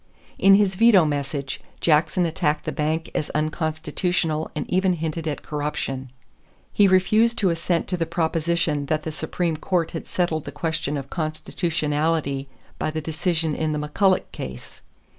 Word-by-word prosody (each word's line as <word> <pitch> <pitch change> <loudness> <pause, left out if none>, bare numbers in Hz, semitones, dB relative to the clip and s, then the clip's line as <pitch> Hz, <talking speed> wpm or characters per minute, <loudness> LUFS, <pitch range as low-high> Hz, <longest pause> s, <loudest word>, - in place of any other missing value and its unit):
In 195 0 +7
his 200 -1 +3
veto 205 -3 +6
message, 140 -2 -3 0.2
Jackson 160 +2 +3
attacked 155 -2 0
the - - -1
bank 155 +2 -1
as 150 - -2
unconstitutional 160 +1 -1
and 150 - -3
even 185 0 +2
hinted 160 -1 -3
at 150 - -3
corruption. 145 -3 -3 0.6
He 205 - +5
refused 215 +5 +4
to 190 -4 +3
assent 170 +1 0
to 180 - 0
the 165 -1 -1
proposition 165 -2 0
that 155 +1 0
the 160 - -3
Supreme 160 +1 -2
Court 170 +1 0
had 165 - -6
settled 165 -4 -1
the 145 - -5
question 150 -1 -2
of 135 -1 -7
constitutionality 155 -3 -1 0.3
by - - 0
the 155 0 -3
decision 160 +1 -1
in 155 +1 -1
the - - -1
McCulloch 190 +5 +2
case. - - -8
160 Hz, 155 wpm, -24 LUFS, 150-175 Hz, 0.6 s, In